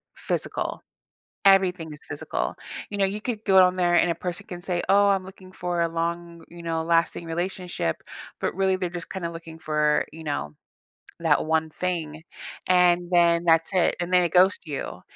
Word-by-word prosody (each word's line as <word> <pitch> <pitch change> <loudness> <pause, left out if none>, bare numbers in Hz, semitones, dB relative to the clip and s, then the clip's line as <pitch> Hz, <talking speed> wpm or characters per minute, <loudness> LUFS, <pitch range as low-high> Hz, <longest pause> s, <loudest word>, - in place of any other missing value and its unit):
physical. - - -3 0.6
Everything 180 -5 +4
is 150 - -12
physical. 105 - -3 0.4
You 205 - -5
know, 195 - +3
you 205 +2 -3
could 225 -3 -4
go 190 -2 +6
on 180 0 +3
there 175 -1 +2
and 175 - +4
a - - -2
person 180 +2 -5
can 175 -3 -7
say, 175 -1 -2
"Oh, 200 +1 +5
I'm 195 -1 +2
looking 190 -1 -13
for 175 -2 -2
a 170 - +2
long, 170 0 -4
you 170 0 -11
know, 165 -1 -1
lasting 170 0 +1
relationship," 175 - -3 0.4
but, - - -1
really, 190 -1 +2
they're 180 -2 -2
just 170 -1 -7
kinda 170 -3 -4
looking 165 -1 -10
for, 150 -1 +1
you 160 0 -10
know, 75 - -3 0.6
that 160 -2 +2
one 160 0 +1
thing, 160 -3 -4 0.4
and 180 -1 +4
then 170 -1 +4
that's 165 +1 +3
it, 180 - +2
and 175 +1 -3
they 180 -1 +5
ghost 185 +3 +3
you. 145 -3 -5
175 Hz, 180 wpm, -25 LUFS, 165-185 Hz, 0.6 s, go